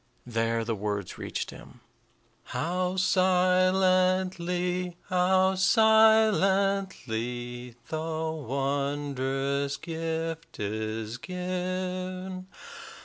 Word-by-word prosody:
There 115 -1 0
the 115 - -1
words 105 -2 -4
reached - - -4
him: 120 - -14 0.6
"How 180 +2 -1
silently, 185 -1 +2
how 185 +1 +3
silently, 195 - +2
The 160 0 -2
wondrous 140 -1 -1
gift 165 0 -4
is 110 +2 -3
given! 185 +1 -4
175 Hz, 65 wpm, -28 LUFS, 135-185 Hz, 0.6 s, how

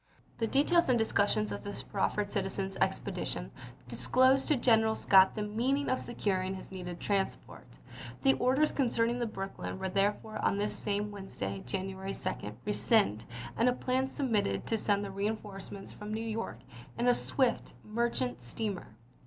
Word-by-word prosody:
The 225 - +1
details 300 +6 +3
and 250 - +5
discussions 215 -1 +2
of - - -5
this 205 - -5
proffered 205 0 -1
citizens' 195 0 -2
expedition - - -1 0.4
disclosed 260 +1 +3
to 300 - +4
General 225 -3 +4
Scott 190 -2 +6
the 210 - -1
means 250 +7 0
of 255 - +1
securing 190 -5 -1
his 190 - -10
needed 180 -2 -6
transport. 195 -2 -2 0.6
The 135 - +6
orders 265 - +3
concerning 240 -2 +1
the 240 - 0
Brooklyn 195 -2 -5
were 190 0 -2
therefore 205 +3 0
on 200 - +2
this 205 +1 -1
same 210 0 -2
Wednesday, 100 - -5
January 190 0 -3
2, 105 +1 -4
rescinded, 205 - +2 0.3
and 235 +2 +4
a - - +2
lsei. - - -11
plan 260 +1 +1
substituted 215 - 0
to - - 0
send 205 -1 +1
the 195 - -5
reinforcements 200 -1 -4
from 210 +1 -7
New 220 +1 -2
York 225 +1 -3 0.4
in 240 +1 +1
a 245 - +7
swift 255 -1 0
merchant 215 - -1
steamer. 180 - -4
210 Hz, 160 wpm, -31 LUFS, 195-235 Hz, 0.6 s, a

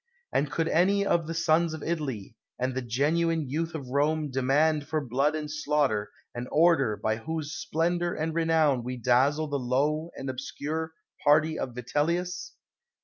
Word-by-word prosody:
And 140 +1 +1
could 165 +3 -1
any 200 +5 +3
of 170 -4 +1
the 165 - -3
sons 165 0 +2
of 155 - -8
Italy, 135 - -3 0.2
and 130 +1 -1
the 130 - -2
genuine 155 +6 +1
youth 165 +5 -2
of 135 -5 -6
Rome, 150 +2 +1
demand 145 +4 +2
for 155 - 0
blood 140 +3 0
and 155 -1 -3
slaughter, 145 -9 0 0.2
an 120 +1 -5
order, 150 -9 +3
by 110 0 -1
whose 155 +4 -4
splendor 170 +7 -1
and 160 +1 -2
renown 160 -6 +2
we 125 +1 -4
dazzle 130 +6 +2
the 145 -1 -2
low 145 +6 0
and 135 - -5
obscure 140 +5 -4 0.3
party 155 +2 +4
of 125 -2 -4
Vitellius? 170 +8 -1
150 Hz, 160 wpm, -28 LUFS, 130-160 Hz, 0.3 s, party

